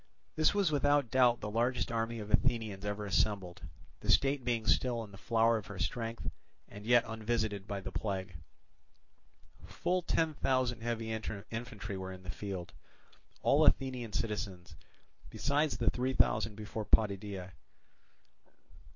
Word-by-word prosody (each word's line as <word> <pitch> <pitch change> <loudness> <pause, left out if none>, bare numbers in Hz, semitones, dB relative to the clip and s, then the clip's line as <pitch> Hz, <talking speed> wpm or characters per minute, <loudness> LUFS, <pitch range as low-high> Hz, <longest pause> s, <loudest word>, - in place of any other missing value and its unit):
This 155 +5 +3
was 195 -6 +3
without 145 -3 +2
doubt 125 -2 +4
the 105 - -4
largest 120 +3 0
army 115 0 -1
of 105 -1 -6
Athenians 110 -6 +1
ever 105 0 -3
assembled, 95 -1 0 0.4
the - - -8
state 135 -1 +4
being 120 -2 0
still 120 0 +2
in 105 - -11
the - - -11
flower 115 0 +3
of 105 - -11
her 105 - -8
strength 115 +5 -3 0.4
and 105 +1 -10
yet 120 -1 +6
unvisited 110 -3 -2
by 100 -2 -3
the - - -6
plague. 95 -3 -3 1.3
Full 175 - 0
ten 160 -2 +1
thousand 130 -4 0
heavy 115 -1 -2
infantry 110 -1 -5
were 95 0 -5
in 95 0 -10
the 90 - -5
field, 95 -1 -6 0.7
all - - +5
Athenian 125 -4 +2
citizens, 95 -6 -3 0.5
besides 145 +1 0
the - - +2
three 130 +1 -1
thousand 110 -3 +2
before 105 +1 -5
Potidæa. 100 -3 +1
110 Hz, 140 wpm, -33 LUFS, 100-125 Hz, 1.3 s, yet